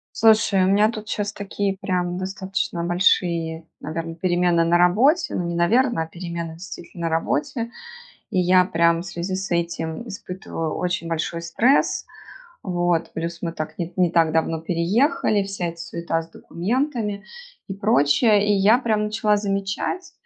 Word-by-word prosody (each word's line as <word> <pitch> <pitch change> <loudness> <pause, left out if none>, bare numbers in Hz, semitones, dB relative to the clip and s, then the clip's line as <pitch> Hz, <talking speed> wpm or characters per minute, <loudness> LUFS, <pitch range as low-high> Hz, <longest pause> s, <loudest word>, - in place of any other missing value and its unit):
Слушай, 220 -3 +4
у - - +3
меня 205 +3 +4
тут 215 -2 -8
щас 205 0 -2
такие 200 -1 -2
прям 180 -2 -1
достаточно 190 -2 -3
большие 170 -2 +1
наверное 165 +2 -5
перемены 175 0 +2
на 170 +1 +3
работе. 235 - +3
Ну 180 - -1
не 170 - -3
наверное, 225 +3 +2
а - - -8
перемены 170 -1 -6
действительно 170 0 -7
на - - -1
работе. 165 - -1 0.6
И - - -2
я 180 0 +5
прям 170 0 +2
в - - -12
связи 175 +1 -4
с 190 0 -4
этим 170 +2 -2
испытываю 180 -6 -5
очень 175 -1 -2
большой 165 0 -2
стресс. 225 +11 +2 0.6
Вот. 175 -2 0
Плюс 170 +1 -4
мы 170 - -1
так, 155 -2 -6
ни, 170 0 -4
не 180 -2 +2
так 165 -2 +4
давно 160 0 0
переехали, 200 - +1
вся 195 -3 -4
эта 170 0 -6
суета 170 -1 -3
с 165 - -16
документами 210 - -2 0.4
и 195 - -5
прочее. 205 - +3
И - - +4
я 205 +4 +5
прям 215 -4 0
начала 210 0 +1
замечать, 200 - -2
180 Hz, 155 wpm, -23 LUFS, 170-205 Hz, 0.6 s, я